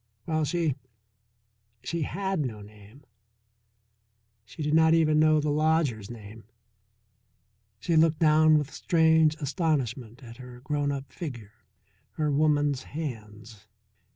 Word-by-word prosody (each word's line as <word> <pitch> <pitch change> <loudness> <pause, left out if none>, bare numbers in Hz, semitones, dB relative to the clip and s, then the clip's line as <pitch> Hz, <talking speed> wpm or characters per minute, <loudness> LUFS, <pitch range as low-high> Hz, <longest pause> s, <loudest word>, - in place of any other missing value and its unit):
While 155 -1 -1
she 165 -2 0 1.1
she 170 +6 -3
had 190 +4 -2
no 115 -8 -4
name, 105 +6 -16 1.4
she 125 +7 -8
did 150 +1 -1
not 160 0 +5
even 155 -2 +3
know 155 0 +4
the 150 0 -1
lodger's 150 -9 0
name. 110 -2 -11 1.3
She 170 - -1
looked 160 0 +3
down 155 0 +4
with 150 -1 -3
strange 160 -2 +3
astonishment 135 - -3
at 115 -1 -12
her 125 -1 -12
grown 145 +1 -2
up 140 -1 -6
figure, 120 - -8 0.6
her 150 -1 -1
woman's 145 -2 +1
hands. 110 -8 -8
150 Hz, 120 wpm, -27 LUFS, 120-155 Hz, 1.4 s, not